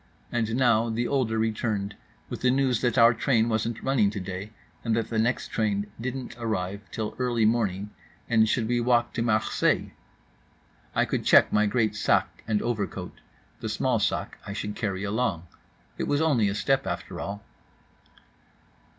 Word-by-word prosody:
And 115 Hz, -1 st, 0 dB
now 120 Hz, -3 st, +3 dB
the 115 Hz, +2 st, -1 dB
older 125 Hz, -5 st, 0 dB
returned 110 Hz, -2 st, -1 dB, 0.3 s
with -, -, -6 dB
the 125 Hz, -, +3 dB
news 130 Hz, -2 st, +2 dB
that 120 Hz, -1 st, +1 dB
our 115 Hz, 0 st, +7 dB
train 115 Hz, -1 st, +2 dB
wasn't 110 Hz, 0 st, -1 dB
running 130 Hz, -7 st, +3 dB
today, 95 Hz, 0 st, -5 dB, 0.3 s
and 115 Hz, -2 st, +1 dB
that 115 Hz, -1 st, -1 dB
the 110 Hz, -, +1 dB
next 120 Hz, +3 st, 0 dB
train 105 Hz, -2 st, -1 dB
didn't 130 Hz, 0 st, -4 dB
arrive 100 Hz, -4 st, -2 dB
till 110 Hz, -1 st, -4 dB
early 120 Hz, -3 st, +1 dB
morning 105 Hz, -3 st, 0 dB, 0.4 s
and 110 Hz, -2 st, +4 dB
should 115 Hz, -2 st, +1 dB
we 120 Hz, 0 st, +1 dB
walk 120 Hz, 0 st, +2 dB
to -, -, -2 dB
Marseilles? 110 Hz, -2 st, +1 dB, 1.0 s
I -, -, +3 dB
could -, -, -2 dB
check -, -, +5 dB
my 105 Hz, 0 st, +4 dB
great 110 Hz, -1 st, +1 dB
sac 110 Hz, -, +1 dB
and 105 Hz, -2 st, +1 dB
overcoat. 100 Hz, -6 st, -3 dB, 0.4 s
The -, -, -4 dB
small -, -, +1 dB
sac -, -, -1 dB
I 100 Hz, -, -6 dB
should 105 Hz, 0 st, -4 dB
carry 100 Hz, -3 st, -2 dB
along—it 100 Hz, -5 st, -4 dB
was 145 Hz, -, +1 dB
only 135 Hz, -10 st, +3 dB
a 100 Hz, -, -2 dB
step, 135 Hz, -1 st, +1 dB
after 85 Hz, -1 st, -4 dB
all. 100 Hz, +1 st, -5 dB
110 Hz, 160 wpm, -26 LUFS, 105-120 Hz, 1.0 s, our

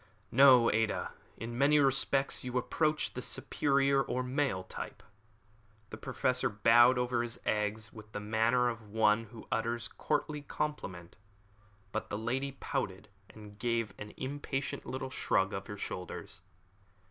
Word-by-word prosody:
"No, 130 Hz, -2 st, +7 dB
Ada; 110 Hz, 0 st, 0 dB, 0.3 s
in 115 Hz, +1 st, -6 dB
many 140 Hz, +4 st, +4 dB
respects 135 Hz, 0 st, +3 dB
you 125 Hz, 0 st, -2 dB
approach 155 Hz, +4 st, 0 dB
the -, -, -4 dB
superior 140 Hz, -1 st, +1 dB
or 130 Hz, -1 st, -2 dB
male 130 Hz, -7 st, 0 dB
type." 95 Hz, -, -8 dB, 0.9 s
The 110 Hz, -, -6 dB
Professor 125 Hz, +3 st, 0 dB
bowed 120 Hz, +4 st, +6 dB
over 125 Hz, -1 st, +1 dB
his 120 Hz, -1 st, -4 dB
egg 105 Hz, 0 st, 0 dB
with 110 Hz, -1 st, -12 dB
the 105 Hz, -, -4 dB
manner 110 Hz, +4 st, +2 dB
of 115 Hz, -3 st, -5 dB
one 110 Hz, +1 st, +3 dB
who 115 Hz, 0 st, -12 dB
utters 115 Hz, +1 st, -1 dB
a -, -, -8 dB
courtly 150 Hz, 0 st, -1 dB
compliment; 140 Hz, -, -5 dB, 0.7 s
but -, -, -3 dB
the 100 Hz, -, -2 dB
lady 130 Hz, +5 st, -2 dB
pouted, 105 Hz, -8 st, -4 dB, 0.2 s
and 105 Hz, -1 st, -13 dB
gave 115 Hz, -4 st, -1 dB
an 105 Hz, 0 st, -8 dB
impatient 135 Hz, 0 st, -4 dB
little 130 Hz, 0 st, -4 dB
shrug 95 Hz, -5 st, +1 dB
of 95 Hz, -, -5 dB
her 105 Hz, -, -6 dB
shoulders. 95 Hz, +1 st, -6 dB
120 Hz, 145 wpm, -32 LUFS, 105-135 Hz, 0.9 s, No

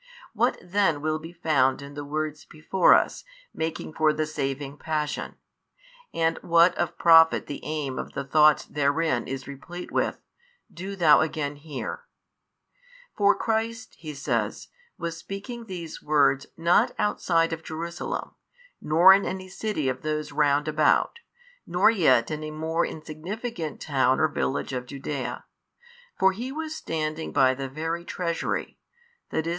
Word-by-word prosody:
What -, -, +1 dB
then 180 Hz, -5 st, +1 dB
will 155 Hz, 0 st, 0 dB
be 165 Hz, +2 st, -9 dB
found 150 Hz, -6 st, +2 dB
in 140 Hz, 0 st, -10 dB
the 145 Hz, 0 st, -6 dB
words 155 Hz, +1 st, -3 dB
before 160 Hz, +4 st, +3 dB
us -, -, 0 dB, 0.3 s
making 160 Hz, -1 st, -4 dB
for 155 Hz, 0 st, +3 dB
the 155 Hz, +1 st, -1 dB
saving 140 Hz, -1 st, -4 dB
Passion, 150 Hz, -2 st, -3 dB, 0.8 s
and 165 Hz, 0 st, 0 dB
what 170 Hz, +1 st, +4 dB
of 175 Hz, -1 st, -2 dB
profit 165 Hz, -1 st, +6 dB
the 145 Hz, -, -7 dB
aim 145 Hz, -4 st, -3 dB
of -, -, -6 dB
the 140 Hz, -, -3 dB
thoughts 150 Hz, +2 st, +4 dB
therein 145 Hz, -2 st, 0 dB
is 130 Hz, 0 st, -5 dB
replete 165 Hz, +6 st, -8 dB
with, -, -, 0 dB, 0.5 s
do 190 Hz, +3 st, -6 dB
thou 160 Hz, -6 st, +6 dB
again 155 Hz, -2 st, -2 dB
hear. 150 Hz, -, -6 dB, 1.1 s
For 205 Hz, -1 st, +4 dB
Christ 225 Hz, +1 st, -2 dB
(he 155 Hz, -2 st, -7 dB
says) 140 Hz, -, -2 dB, 0.3 s
was 170 Hz, -2 st, -4 dB
speaking 200 Hz, +7 st, -7 dB
these 170 Hz, -4 st, -7 dB
words 140 Hz, -2 st, +2 dB
not 170 Hz, +1 st, +3 dB
outside 165 Hz, -5 st, +1 dB
of 160 Hz, -, -5 dB
Jerusalem, 165 Hz, +2 st, -5 dB, 0.5 s
nor 170 Hz, +5 st, +7 dB
in 195 Hz, +1 st, +3 dB
any 185 Hz, 0 st, -5 dB
city 195 Hz, -6 st, -2 dB
of 130 Hz, -1 st, -2 dB
those 155 Hz, 0 st, -3 dB
round 145 Hz, 0 st, +2 dB
about, 155 Hz, -, +2 dB, 0.5 s
nor 180 Hz, +5 st, +4 dB
yet 130 Hz, -, +3 dB
in 155 Hz, 0 st, -4 dB
a 155 Hz, -, -4 dB
more 160 Hz, +2 st, -1 dB
insignificant 165 Hz, +3 st, -6 dB
town 130 Hz, -3 st, +2 dB
or 155 Hz, -, +4 dB
village 140 Hz, -2 st, -2 dB
of 125 Hz, -1 st, -4 dB
Judaea, 140 Hz, 0 st, -5 dB, 0.7 s
for 190 Hz, 0 st, +4 dB
He 240 Hz, +7 st, -5 dB
was 315 Hz, +2 st, -4 dB
standing 160 Hz, -, -3 dB
by 130 Hz, -1 st, +4 dB
the 135 Hz, 0 st, -5 dB
very 165 Hz, +4 st, -3 dB
treasury, 170 Hz, -1 st, -3 dB, 0.5 s
i. -, -, -3 dB
e. 160 Hz, -, +1 dB
155 Hz, 150 wpm, -26 LUFS, 145-175 Hz, 1.1 s, nor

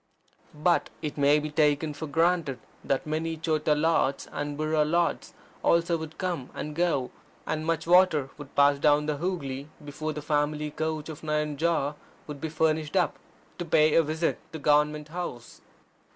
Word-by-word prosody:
But 170 Hz, +3 st, +2 dB
it 150 Hz, -, -3 dB
may 145 Hz, +1 st, +4 dB
be 150 Hz, 0 st, -3 dB
taken 150 Hz, 0 st, +2 dB
for 155 Hz, +2 st, -6 dB
granted 165 Hz, -2 st, +1 dB, 0.3 s
that 135 Hz, -, -1 dB
many 160 Hz, +1 st, -2 dB
Chota 155 Hz, -1 st, +1 dB
Lords 150 Hz, -3 st, +1 dB
and 145 Hz, 0 st, -4 dB
Burro 155 Hz, 0 st, +2 dB
Lords 170 Hz, +3 st, 0 dB, 0.3 s
also 170 Hz, 0 st, +3 dB
would 160 Hz, -1 st, -6 dB
come 175 Hz, -9 st, -3 dB
and 150 Hz, -, -5 dB
go, 165 Hz, -7 st, 0 dB, 0.3 s
and 155 Hz, +1 st, -3 dB
much 165 Hz, -1 st, 0 dB
water 170 Hz, -6 st, +4 dB
would 145 Hz, -1 st, -11 dB
pass 140 Hz, 0 st, +5 dB
down 150 Hz, 0 st, +4 dB
the 150 Hz, -1 st, -1 dB
Hoogly, 145 Hz, -6 st, -3 dB, 0.2 s
before 155 Hz, +2 st, -4 dB
the 150 Hz, -1 st, -6 dB
family 150 Hz, 0 st, 0 dB
coach 155 Hz, 0 st, -3 dB
of 155 Hz, -1 st, -8 dB
Nayanjore 150 Hz, 0 st, 0 dB, 0.3 s
would 145 Hz, -2 st, -8 dB
be 160 Hz, -, -2 dB
furnished 155 Hz, 0 st, 0 dB
up 180 Hz, -2 st, +1 dB, 0.4 s
to -, -, -1 dB
pay 155 Hz, -2 st, +3 dB
a 165 Hz, -, +6 dB
visit 160 Hz, +2 st, -1 dB
to -, -, -4 dB
Government 150 Hz, 0 st, +2 dB
House. 155 Hz, -8 st, -6 dB
155 Hz, 165 wpm, -27 LUFS, 145-160 Hz, 0.4 s, a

